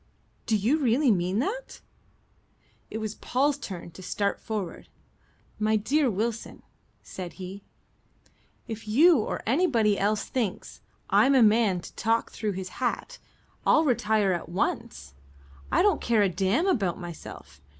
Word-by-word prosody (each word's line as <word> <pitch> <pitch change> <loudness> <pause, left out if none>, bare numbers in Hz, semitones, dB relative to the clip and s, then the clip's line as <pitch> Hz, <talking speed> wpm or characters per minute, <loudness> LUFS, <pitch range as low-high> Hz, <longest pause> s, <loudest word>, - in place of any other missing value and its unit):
"Do 220 - +3
you 240 +10 +1
really 260 0 +3
mean 180 0 0
that?" 415 - -3 1.1
It - - -5
was 215 -1 -4
Paul's 280 +5 0
turn 180 -8 -7
to 165 - -12
start 200 +2 -1
forward. 210 -6 -5 0.7
"My 215 0 +2
dear 265 +7 +2
Wilson," 225 +2 -3 0.4
said 180 -2 -7
he, 190 +1 -8 1.1
"if 225 -2 -7
you 305 +8 +6
or 215 - -3
anybody 230 - +2
else 210 +2 +1
thinks 225 -7 -4 0.3
I'm 275 +1 +5
a 255 - +6
man 210 -4 +3
to - - -11
talk 225 +2 0
through 215 -2 -3
his 185 -1 -7
hat, - - -2 0.4
I'll 315 - +4
retire 220 -6 +2
at 170 - -4
once. 70 - -3 0.6
I - - +4
don't 410 -1 +3
care 225 -3 +3
a 195 - +2
damn 190 - +1
about 200 - 0
myself. 165 - -10
215 Hz, 140 wpm, -27 LUFS, 190-255 Hz, 1.1 s, you